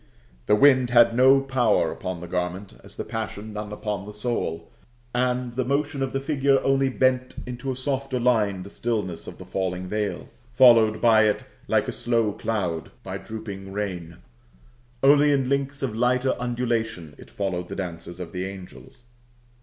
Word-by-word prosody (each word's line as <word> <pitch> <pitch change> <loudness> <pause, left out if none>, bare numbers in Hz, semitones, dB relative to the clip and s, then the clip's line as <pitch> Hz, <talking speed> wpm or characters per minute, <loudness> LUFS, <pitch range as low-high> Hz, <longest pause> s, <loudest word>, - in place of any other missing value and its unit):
The 105 - +5
wind 130 0 +5
had 120 -1 +5
no 130 +2 +6
power 120 -11 +2
upon 90 -2 -5
the 90 - -7
garment, 90 +2 -3
as - - -12
the - - -3
passion 110 -1 -5
none 105 0 -5
upon 105 -1 -4
the 105 - -8
soul; 105 -7 -3 0.5
and 125 0 0
the 130 +2 -1
motion 140 +2 -1
of 135 -1 -1
the 135 - -1
figure 140 -1 +2
only 135 0 +2
bent 130 0 +1
into 125 +2 -4
a - - -3
softer 135 0 -2
line 105 -6 +1
the 100 - -11
stillness 105 -8 -3
of - - -8
the - - -10
falling 95 -1 -3
veil, 105 +2 -3 0.2
followed 115 -3 +6
by 110 -2 +5
it 105 - +1 0.2
like - - +2
a - - -1
slow 115 -3 0
cloud 95 -9 -2
by - - -5
drooping 100 -3 -8
rain: 90 -5 -4 0.9
only 145 +1 +6
in 135 -2 +1
links 140 0 -1
of 120 -5 -2
lighter 125 +2 +2
undulation 115 -9 -2
it - - -13
followed 90 -3 -3
the - - -6
dances 85 -1 -6
of 85 -2 -6
the 90 0 -4
angels. 100 +7 -11
115 Hz, 170 wpm, -24 LUFS, 95-130 Hz, 0.9 s, no